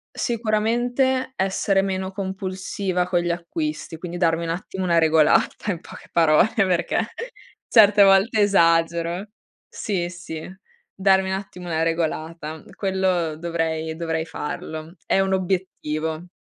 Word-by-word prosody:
Sicuramente 240 Hz, +3 st, 0 dB
essere 195 Hz, 0 st, +1 dB
meno 190 Hz, -1 st, -2 dB
compulsiva 190 Hz, -1 st, -3 dB
con 180 Hz, -1 st, +2 dB
gli 175 Hz, 0 st, -2 dB
acquisti, 160 Hz, -2 st, -4 dB
quindi 175 Hz, +1 st, -6 dB
darmi 170 Hz, -1 st, +1 dB
un -, -, -4 dB
attimo 185 Hz, +2 st, -4 dB
una 170 Hz, -2 st, +2 dB
regolata 160 Hz, +5 st, +3 dB
in 170 Hz, -, -4 dB
poche -, -, -13 dB
parole, 165 Hz, +4 st, +4 dB
perché 185 Hz, -5 st, +1 dB, 0.6 s
certe 210 Hz, -2 st, +7 dB
volte 195 Hz, +3 st, +4 dB
esagero. 170 Hz, 0 st, +2 dB, 0.4 s
Sì, 180 Hz, -5 st, -2 dB
sì. 175 Hz, -3 st, -7 dB, 0.6 s
Darmi 190 Hz, 0 st, +3 dB
un 190 Hz, -, 0 dB
attimo 190 Hz, -2 st, -8 dB
una 160 Hz, -1 st, 0 dB
regolata. 160 Hz, -1 st, -3 dB
Quello 185 Hz, -5 st, 0 dB
dovrei 160 Hz, -1 st, -2 dB
dovrei 160 Hz, -1 st, -2 dB
farlo. 160 Hz, +1 st, -6 dB
È -, -, +2 dB
un 190 Hz, 0 st, +1 dB
obiettivo. 175 Hz, -3 st, -2 dB
180 Hz, 125 wpm, -23 LUFS, 165-195 Hz, 0.6 s, certe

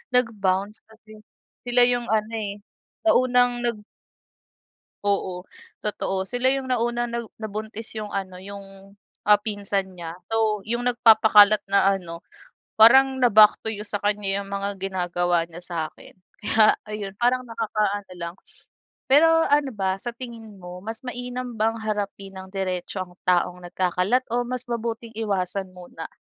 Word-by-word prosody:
Nag-bounce 205 Hz, -4 st, 0 dB
kasi, 215 Hz, -1 st, -17 dB, 0.5 s
sila 245 Hz, 0 st, +3 dB
'yong 245 Hz, -1 st, +1 dB
ano, 220 Hz, 0 st, 0 dB
eh, 205 Hz, -2 st, -4 dB, 0.5 s
na 325 Hz, -, +6 dB
unang 245 Hz, -1 st, +3 dB
nag 235 Hz, -2 st, -1 dB, 1.3 s
Oo. 190 Hz, -3 st, -1 dB, 0.4 s
Totoo. 195 Hz, -2 st, -2 dB
Sila 255 Hz, +1 st, +2 dB
'yong 270 Hz, -1 st, -3 dB
nauna 240 Hz, -1 st, 0 dB
'no, 235 Hz, -2 st, -5 dB
nabuntis 220 Hz, +1 st, -6 dB
'yong 210 Hz, -1 st, -5 dB
ano 190 Hz, -2 st, -4 dB
'yong, 195 Hz, 0 st, -11 dB, 0.3 s
ah, 205 Hz, 0 st, +5 dB
pinsan 200 Hz, -3 st, -2 dB
niya. 165 Hz, -1 st, -6 dB, 0.2 s
So, 220 Hz, -2 st, +1 dB
'yong 240 Hz, +1 st, -1 dB
nagpapakalat 215 Hz, -3 st, +6 dB
na 195 Hz, 0 st, +4 dB
ano 170 Hz, -2 st, -8 dB, 0.6 s
parang, 265 Hz, +4 st, +7 dB
na-back 215 Hz, -4 st, +6 dB
to 220 Hz, -, -1 dB
you 210 Hz, -, -6 dB
sa 205 Hz, 0 st, -2 dB
kanya 205 Hz, -1 st, 0 dB
'yong 200 Hz, 0 st, -6 dB
mga 200 Hz, 0 st, -3 dB
ginagawa 175 Hz, -2 st, 0 dB
niya 170 Hz, +2 st, -10 dB
sa'kin. 165 Hz, -3 st, -6 dB, 0.2 s
Kaya 215 Hz, 0 st, +4 dB
ayun, 210 Hz, -2 st, -6 dB
parang 245 Hz, +1 st, +2 dB
nakakaano 210 Hz, -4 st, -2 dB
lang. 170 Hz, -1 st, -6 dB, 0.8 s
Pero 290 Hz, +4 st, +7 dB, 0.2 s
ano 285 Hz, -4 st, +2 dB
ba 190 Hz, -1 st, -1 dB
sa 235 Hz, +3 st, -6 dB
tingin 230 Hz, -3 st, -9 dB
mo, 180 Hz, -2 st, -10 dB
mas 225 Hz, +6 st, -7 dB
mainam 245 Hz, -1 st, -6 dB
bang 225 Hz, +1 st, +2 dB
harapin 205 Hz, -2 st, -4 dB
nang 190 Hz, 0 st, -10 dB
diretso 190 Hz, -1 st, -3 dB
ang 180 Hz, 0 st, -13 dB
taong 180 Hz, 0 st, +2 dB
nagkakalat 185 Hz, +7 st, +1 dB
o 245 Hz, 0 st, 0 dB
mas 250 Hz, 0 st, -3 dB
mabuting 230 Hz, 0 st, -3 dB
iwasan 190 Hz, -3 st, -2 dB
muna? 175 Hz, -2 st, -9 dB
210 Hz, 145 wpm, -24 LUFS, 190-235 Hz, 1.3 s, parang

